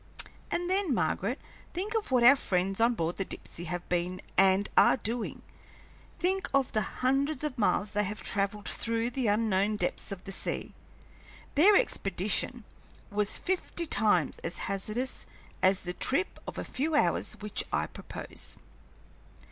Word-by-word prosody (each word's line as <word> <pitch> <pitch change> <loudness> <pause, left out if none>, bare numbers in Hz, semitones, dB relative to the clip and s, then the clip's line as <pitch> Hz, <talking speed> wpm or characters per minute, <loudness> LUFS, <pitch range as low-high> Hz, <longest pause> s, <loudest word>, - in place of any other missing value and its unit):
"And 350 0 -1
then, 375 -6 +1
Margaret, 200 - 0 0.4
think 400 +5 -2
of 445 -2 -1
what 250 -2 +3
our 260 +4 +9
friends 195 -3 0
on 235 +1 +4
board 165 -3 -1
the 195 - 0
Dipsey 175 -2 -5
have 175 0 -4
been 180 +1 -1 0.2
and 195 +1 +5
are - - +6
doing! 230 +1 -3 0.7
Think 380 +2 0
of 275 -2 +2
the 215 - +1
hundreds 270 +7 0
of 300 -4 -2
miles 205 -1 +2
they 210 0 +1
have 210 +3 -5
travelled 200 +1 -1
through 230 +1 0
the 250 -1 -1
unknown 210 -1 +2
depths 210 - -1
of 195 -2 -6
the 195 - -7
sea! - - -3 0.8
Their 380 +8 +6
expedition 210 - +1 0.5
was 205 0 0
fifty 360 -2 -2
times 205 - +2
as 170 +1 -4
hazardous 215 +6 -3 0.3
as 190 0 +4
the 180 -1 -4
trip 320 - 0
of - - -6
a - - -2
few 305 +4 -1
hours 290 - +2
which 210 -1 -2
I - - +1
propose." - - -8
215 Hz, 155 wpm, -30 LUFS, 195-275 Hz, 0.8 s, our